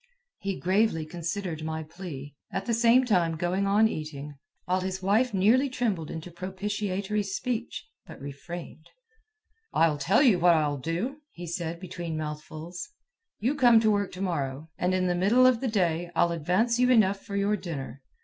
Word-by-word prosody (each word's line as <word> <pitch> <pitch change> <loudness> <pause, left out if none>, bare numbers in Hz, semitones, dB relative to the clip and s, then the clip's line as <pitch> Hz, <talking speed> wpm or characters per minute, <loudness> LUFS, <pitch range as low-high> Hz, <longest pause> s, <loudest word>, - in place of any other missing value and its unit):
He 195 -1 -2
gravely 185 -3 +2
considered 170 0 -4
my 160 0 -3
plea, 155 -4 -8 0.2
at 195 - -3
the 235 - 0
same 235 +3 +5
time 175 -8 +2
going 185 +4 0
on 210 +3 +5
eating, 150 -5 -6 0.3
while 185 +1 +1
his 190 0 -4
wife 220 +6 +3
nearly 220 +8 +3
trembled 215 -11 -1
into 165 +2 -7
propitiatory 195 +3 -2
speech, 235 +7 -3 0.2
but - - -11
refrained. 155 +4 -8 0.8
"I'll 160 -3 +3
tell 190 - +3
you 220 -10 +5
what 175 0 +5
I'll 145 -3 0
do," 175 - -2
he 175 -7 -9
said 170 0 -4
between 170 -3 -5
mouthfuls. 155 - -6 0.5
"You 245 +7 0
come 245 -5 +6
to 220 -1 +3
work 205 -1 0
to 185 - -7
morrow, 150 -4 -3
and 180 +1 0
in 185 0 +1
the 180 - +2
middle 205 +8 +4
of 255 -3 +4
the 265 - 0
day 175 -6 0
I'll 170 0 +3
advance 185 +9 +1
you 250 0 +4
enough 200 -5 +4
for 200 - -6
your 200 +1 +2
dinner. 145 -8 -6
185 Hz, 170 wpm, -27 LUFS, 165-210 Hz, 0.8 s, come